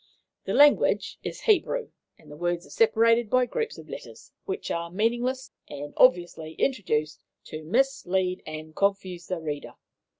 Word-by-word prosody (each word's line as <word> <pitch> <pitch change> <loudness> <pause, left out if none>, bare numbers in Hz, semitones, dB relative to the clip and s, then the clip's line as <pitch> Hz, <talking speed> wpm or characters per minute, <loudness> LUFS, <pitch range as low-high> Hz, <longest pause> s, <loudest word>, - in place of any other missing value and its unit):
'The - - -2
language 290 0 +4
is - - -6
Hebrew, 455 +3 +1 0.3
and 150 - -17
the - - -9
words 175 +2 -2
are - - -16
separated 230 - +3
by 255 +2 +3
groups 455 - -3
of - - -11
letters, - - -10
which 390 0 -4
are 170 0 -2
meaningless, 240 +7 -1 0.2
and 145 0 -7
obviously 175 -9 +3
introduced 155 - -1 0.2
to 155 0 -8
mislead 190 - 0
and 155 0 -8
confuse 190 -3 -1
the 180 -2 -3
reader. 150 -3 -5
190 Hz, 145 wpm, -26 LUFS, 160-255 Hz, 0.3 s, language